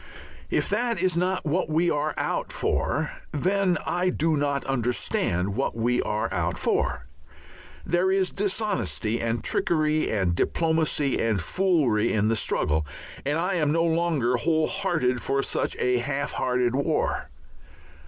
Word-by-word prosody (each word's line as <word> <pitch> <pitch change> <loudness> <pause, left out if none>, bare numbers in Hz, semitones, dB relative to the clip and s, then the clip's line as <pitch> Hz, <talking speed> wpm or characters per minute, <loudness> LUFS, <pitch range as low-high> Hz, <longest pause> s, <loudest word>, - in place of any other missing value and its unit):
If - - +1
that 230 0 0
is 185 -1 +1
not 180 +1 0
what 160 +2 0
we 165 +3 +2
are 150 +1 -1
out - - -2
for, - - -1 0.2
then 185 +3 +1
I 180 +1 +1
do 165 -2 +1
not 140 -1 -1
understand 120 -7 0
what 135 -1 -1
we 120 +2 +1
are 105 -2 -2
out 90 -1 -1
for; - - 0 0.8
there 175 +2 +2
is 190 -1 +1
dishonesty 120 - -1
and 115 0 -1
trickery 155 -2 +1
and 95 -5 +1
diplomacy 160 - +1
and 110 -3 +1
foolery 135 - +2
in 105 0 +2
the 115 - +2
struggle, 80 -6 0 0.4
and 145 +2 +1
I 180 +4 0
am 155 -5 +1
no 165 +2 +2
longer 160 -7 +1
whole 155 +4 +2
hearted 160 - 0
for 135 0 0
such - - -1
a 125 0 +2
half 140 +3 -2
hearted 125 -1 0
war. 140 +4 0
150 Hz, 145 wpm, -25 LUFS, 120-175 Hz, 0.8 s, we